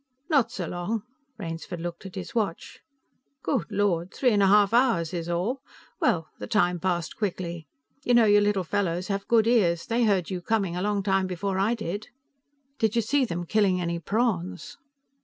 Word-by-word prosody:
"Not 255 -6 +3
so 190 -7 -4
long." 180 +6 -3 0.3
Rainsford 165 +2 -6
looked 175 +3 -6
at 185 - -12
his 190 - -6
watch. 210 -8 -2 0.6
"Good 265 -7 0
Lord, 185 -3 0
three 250 -3 +2
and 205 -2 +3
half 200 +1 +5
hours 230 -10 +3
is 170 -1 -3
all. 195 +10 -1 0.4
Well, 175 - +1
the - - -6
time 180 -4 +2
passed 175 -2 -1
quickly. 175 -6 -4 0.4
You 245 - +3
know, 235 -2 +6
your 205 -1 +5
little 205 -2 +1
fellows 180 0 -1
have 195 0 -2
good 225 -2 +4
ears. 185 -8 +2
They 235 +1 +1
heard 195 -4 +1
you 180 -1 -3
coming 195 -2 0
a 180 - -2
long 205 0 0
time 190 -1 +1
before 190 +1 -2
I 215 +5 +2
did." 205 -1 -5 0.7
"Did 220 0 +1
you 230 - +2
see 275 +4 +2
them 175 -5 -4
killing 195 -1 +2
any 170 -1 -2
prawns?" 210 +3 -2
195 Hz, 180 wpm, -26 LUFS, 175-220 Hz, 0.7 s, know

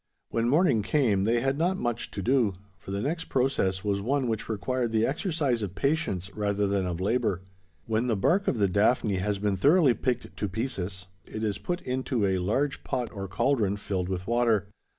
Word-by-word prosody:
When 115 +1 +1
morning 145 - +4
came, 105 -5 +2
they 115 +2 +2
had 135 +2 0
not 180 +3 +1
much 120 -6 -2
to - - -5
do: 120 -6 +2 0.2
for 100 - -12
the 100 +2 -2
next 165 +3 -2
process 100 -8 0
was 100 -1 0
one 130 +4 0
which 110 -1 -3
required 120 +2 -1
the 110 0 +2
exercise 145 - 0
of 95 -3 -4
patience 100 - -1
rather 105 -1 0
than 100 -2 0
of 85 -1 -3
labour. 100 -2 0 0.4
When 110 +2 0
the 115 -4 +1
bark 185 - +2
of - - +1
the 100 -2 +3
daphne 105 +1 +2
has 100 +2 -1
been 100 -1 0
thoroughly 145 - +5
picked 125 0 -2
to 105 - -2
pieces, 95 -4 -3 0.2
it 110 - -6
is 105 -2 -1
put 175 0 -3
into 125 -3 -1
a 95 -1 +1
large 135 +10 -1
pot 125 -3 -2
or 100 -1 -5
cauldron 105 -1 +1
filled 95 -3 -3
with 95 -1 -3
water. 115 -3 +2
110 Hz, 195 wpm, -27 LUFS, 100-130 Hz, 0.4 s, thoroughly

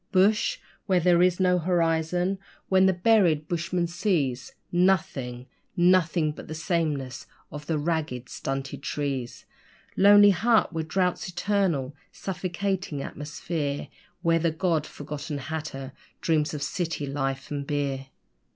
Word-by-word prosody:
Bush! 210 - +3 0.3
where 185 -3 +3
there 175 0 +4
is 180 0 +3
no 180 -1 +3
horizon! 175 +2 +1 0.3
where 190 0 +5
the 190 - +5
buried 180 -5 +3
bushman 175 +1 -1
sees 170 - -1 0.2
Nothing 175 -10 +1 0.3
Nothing! 175 -3 +3
but - - -10
the 155 - -6
sameness 155 -6 -2 0.2
of 150 0 -8
the 160 - 0
ragged, 150 -5 -2
stunted 135 +1 -4
trees! 140 -5 -3 0.5
Lonely 205 +1 +8
hut 215 +1 +2
where 160 -1 -1
drought's 180 +3 0
eternal, 175 -7 0 0.2
suffocating 185 -4 -3
atmosphere 150 -1 -4 0.3
Where 165 -1 +3
the 165 +1 +2
God 160 -1 0
forgotten 150 +1 -6
hatter 140 -2 -5 0.3
dreams 155 -2 +1
of 145 - -3
city 160 0 -2
life 135 -1 -3
and 140 -1 -3
beer. 140 -2 -2
165 Hz, 125 wpm, -26 LUFS, 145-185 Hz, 0.5 s, Lonely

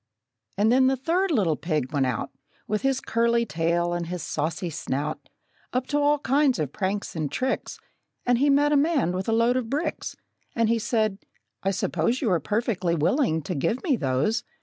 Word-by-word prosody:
And 210 +3 +3
then 260 +1 +5
the 265 - +3
third 350 +9 +1
little 200 - +2
pig 150 -4 -2
went 135 -3 +2
out, 130 +2 -3 0.4
With 210 0 -1
his 270 -1 +1
curly 235 0 +1
tail 170 -1 0
and 175 -1 -2
his 180 -1 -4
saucy 165 +3 -2
snout, 150 -1 -4 0.4
Up 255 0 0
to 290 - +1
all 290 +1 +3
kinds 280 -1 +2
of 150 -4 -3
pranks 200 0 -2
and 155 -3 -2
tricks; 260 +1 -2 0.5
And 245 -1 +3
he 285 +2 +3
met 290 +1 +4
a - - +4
man 285 - +2
with 185 +3 -3
a - - +2
load 230 +2 +3
of 240 -3 -3
bricks, 290 +6 -2 0.4
And 230 -2 +2
he 230 0 +2
said, 215 -3 0 0.4
"I 195 - 0
suppose 190 +4 0
You 230 -8 0
are 175 - +3
perfectly 195 - 0
willing 160 - +1
to 180 - -3
give 165 - -1
me 300 -7 +2
those?" 150 - 0
215 Hz, 195 wpm, -25 LUFS, 165-260 Hz, 0.5 s, then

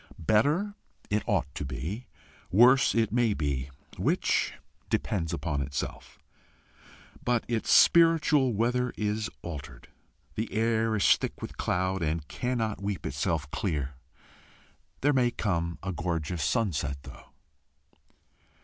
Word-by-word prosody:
Better 145 - +2 0.4
it 105 +1 +2
ought 70 - 0
to - - -4
be, 75 - -5 0.4
worse 125 +6 +6
it 110 -3 +2
may 115 -3 +2
be 70 -3 -2 0.3
which, - - +1 0.4
depends 85 -5 -1
upon 75 -4 -2
itself. 70 -1 -5 1.1
But 120 -2 +1
its 115 -2 -2
spiritual 160 -5 +5
weather 125 +3 +1
is 105 +1 -1
altered. 70 -6 -8 0.4
The 110 +10 -3
air 115 0 +1
is 100 - +5
thick - - -5
with - - -7
cloud, 95 +1 0
and 80 -1 -1
cannot 115 -5 -2
weep 100 -2 -3
itself 75 +1 -2
clear. 75 - -2 1.1
There 145 +2 +3
may 125 -2 +3
come 85 -7 -2
a 95 - -2
gorgeous 85 -1 -2
sunset 80 - 0
though. 70 - -12
100 Hz, 120 wpm, -28 LUFS, 80-120 Hz, 1.1 s, worse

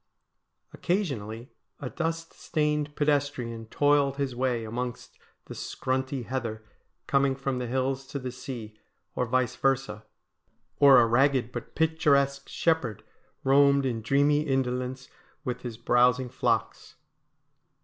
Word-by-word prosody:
Occasionally 130 - -2 0.3
a 140 - -5
dust 165 +3 -3
stained 150 -1 -1
pedestrian 140 -6 -1
toiled 145 +1 +2
his 135 -3 -2
way 125 -2 0
amongst 120 +2 -5 0.3
the - - -8
scrunty 130 0 -3
heather 115 -4 -4 0.4
coming 135 -1 +2
from 135 -1 -2
the 125 - -3
hills 130 +2 -1
to 140 - -5
the 130 -2 -5
sea, 120 -4 -8 0.3
or 125 - -1
vice 130 0 +1
versa; 135 -6 0 0.8
or 140 -2 +8
a 120 - +5
ragged 130 +1 +2
but 120 -1 -7
picturesque 140 -4 +2
shepherd 160 - 0 0.4
roamed 140 0 +4
in 120 -4 -1
dreamy 145 +5 +3
indolence 130 -2 -2 0.4
with 125 -4 -4
his 120 -3 -6
browsing 125 +2 +3
flocks. 130 - -1
130 Hz, 120 wpm, -27 LUFS, 120-140 Hz, 0.8 s, or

